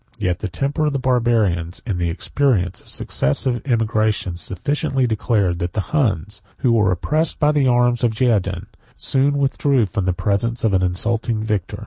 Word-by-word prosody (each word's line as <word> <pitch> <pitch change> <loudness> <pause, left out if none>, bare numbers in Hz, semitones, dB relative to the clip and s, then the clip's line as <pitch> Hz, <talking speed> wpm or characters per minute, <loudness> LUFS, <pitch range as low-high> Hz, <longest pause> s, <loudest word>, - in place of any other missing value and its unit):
Yet 90 -5 -1
the 105 - -3
temper 140 - -1
of 150 - -1
the - - 0
Barbarians, 115 -10 0
and 100 -7 -2
the 85 -1 0
experience 95 0 0
of - - -17
successive 120 - 0
emigrations, 110 -7 0
sufficiently 130 - -1
declare, 110 -4 +1
that 85 0 -4
the 105 +3 -4
Huns, 105 - 0 0.2
who 125 - +1
were 105 -5 +3
oppressed 155 - -1
by 150 -1 +3
the 145 -3 +2
arms 120 -1 +2
of 115 -2 +1
the 130 - +1
Geougen, 110 -6 0 0.3
soon 140 +1 +1
withdrew 140 -2 +2
from 100 0 -3
the 95 - +2
presence 110 +5 -1
of 110 -3 +2
an 95 - +3
insulting 110 +5 0
victor. 105 -5 -2
110 Hz, 175 wpm, -20 LUFS, 95-130 Hz, 0.3 s, were